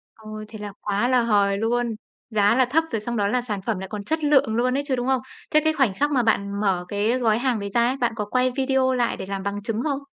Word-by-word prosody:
Ôi, 215 -1 -9
thế 215 0 -10
là 205 -1 -6
quá 205 +3 0
là 255 -1 +3
hời 200 -3 +2
luôn! 230 +1 0 0.3
Giá 210 0 +3
là 260 0 +4
thấp 300 +7 +2
rồi 225 - -1
xong 235 +3 -4
đó 200 -1 +1
là 250 +5 +1
sản 210 -5 -4
phẩm 205 0 -2
lại 190 - -6
còn 205 0 -5
chất 315 +7 -2
lượng 275 -7 +3
luôn 250 +3 +1
ấy 285 - -1
chứ, 265 - +1
đúng 245 0 -3
không? 265 -2 +2 0.3
Thế 305 - +5
cái 315 0 +2
khoảnh 270 -9 +2
khắc 290 +8 0
mà 255 -4 +2
bạn 200 -2 0
mở 190 -4 0
cái 210 +6 0
gói 225 -3 +2
hàng 250 -3 0
đấy 200 0 -4
ra 235 +4 +2
ấy, 260 - -1
bạn 240 -3 0
có 210 -1 -3
quay 255 +4 +1
video 265 -1 +2
lại 245 -2 0
để - - -6
làm 195 0 -4
bằng 200 +1 -3
chứng 225 +1 -2
không? 280 -3 -1
230 Hz, 285 wpm, -23 LUFS, 205-255 Hz, 0.3 s, Thế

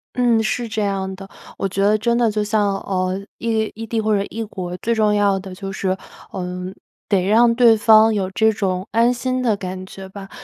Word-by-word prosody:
嗯， 240 -2 +3
是 235 +2 -1
这 220 -1 -3
样 190 -1 -2
的。 195 +1 -10 0.3
我 195 - -1
觉 195 +1 -3
得 210 +2 +4
真 235 +2 +1
的 235 -2 +3
就 210 0 -1
像， 205 -1 +1
呃， 185 0 -2 0.2
异 220 -2 -1
异 225 +1 -6
地 225 0 -1
或 215 -1 +1
者 200 - 0
异 225 +1 -4
国， 180 -4 -6
最 235 +5 -1
重 215 -2 +2
要 200 -2 +2
的 190 -1 -9
就 195 +1 -6
是， 190 0 -2 0.3
呃， 180 0 -5 0.4
得 190 -3 +2
让 230 +4 +4
对 235 -2 +6
方 220 0 +5
有 195 -3 -1
这 220 +3 +2
种 190 -2 -2
安 235 +2 +3
心 255 +1 -2
的 225 -5 +1
感 185 0 -6
觉 195 -1 -10
吧。 195 0 -10
210 Hz, 230 characters per minute, -20 LUFS, 190-225 Hz, 0.4 s, 对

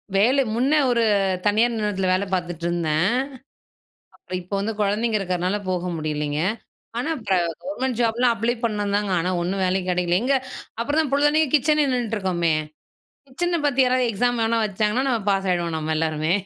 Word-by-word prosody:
வேலை 245 +8 +4
முன்னே 275 +6 +3
ஒரு 235 -1 +2 0.4
தனியார் 225 +3 +3
நிறுவனத்துல 205 -4 -1
வேலை 185 +2 0
பாத்துட்டிருந்தேன். 170 -2 -1 1.1
அப்புறம் 185 - -6
இப்போ 180 +3 -7
வந்து 215 +3 -2
கொழந்தைங்க 215 +2 +1
இருக்கிறனால 185 +1 -1
போக 180 0 -2
முடியலைங்க. 150 -1 -2 0.6
ஆனா 255 +7 -2
இப்ப 210 -5 -1 0.3
கவர்மெண்ட் 265 -4 -3
ஜாப்லாம் 235 +1 +2
அப்ளை 230 +2 0
பண்ணேன் 205 -3 -1
தாங்க. 205 -2 -1
ஆனா 180 +2 -1
ஒண்ணும் 190 +2 -1
வேலையும் 185 0 0
கிடைக்கல. 180 0 +1
எங்கே, 270 +2 +2 0.4
அப்புறம் 290 +7 +1
தான் 305 -4 -1
பொழுதன்னைக்கும் 295 +1 +3
கிச்சனே 300 +1 +3
நின்னுட்டுருக்கோமே! 190 -9 0 0.7
கிச்சன 345 +6 -1
பத்தி 270 -2 +1
யாராவது 255 -1 +2
எக்ஸாம் 245 +3 0
வேணா 225 +1 +1
வச்சாங்கன்னா, 210 +4 0
நம்ம 235 -4 +1
பாஸ் 195 -1 0
ஆயிடுவோம் 170 -2 -1
நம்ம 155 0 -2
எல்லாருமே. 155 0 0
210 Hz, 155 wpm, -23 LUFS, 180-245 Hz, 1.1 s, வேலை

